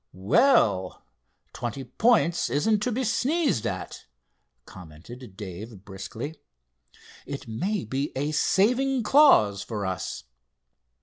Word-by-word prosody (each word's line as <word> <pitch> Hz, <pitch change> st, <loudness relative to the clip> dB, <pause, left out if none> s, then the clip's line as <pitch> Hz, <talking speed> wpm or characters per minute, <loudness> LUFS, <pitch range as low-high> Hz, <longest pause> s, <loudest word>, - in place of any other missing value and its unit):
"Well; 95 Hz, -, +2 dB, 0.5 s
twenty 125 Hz, +3 st, -5 dB
points 205 Hz, -, +2 dB
isn't 205 Hz, -, +1 dB
to 245 Hz, +4 st, -1 dB
be 255 Hz, +3 st, -1 dB
sneezed 255 Hz, -, 0 dB
at," 90 Hz, -1 st, -6 dB, 0.6 s
commented 95 Hz, +6 st, -12 dB
Dave 100 Hz, +1 st, -9 dB
briskly. 110 Hz, -, -7 dB, 0.9 s
"It 140 Hz, -3 st, -7 dB
may 185 Hz, -, -2 dB
be 135 Hz, +6 st, -3 dB
a 145 Hz, +3 st, -1 dB
saving 245 Hz, -, +2 dB
clause 210 Hz, -, +5 dB
for 105 Hz, -3 st, -5 dB
us." 95 Hz, -2 st, -4 dB
135 Hz, 105 wpm, -26 LUFS, -, 0.9 s, clause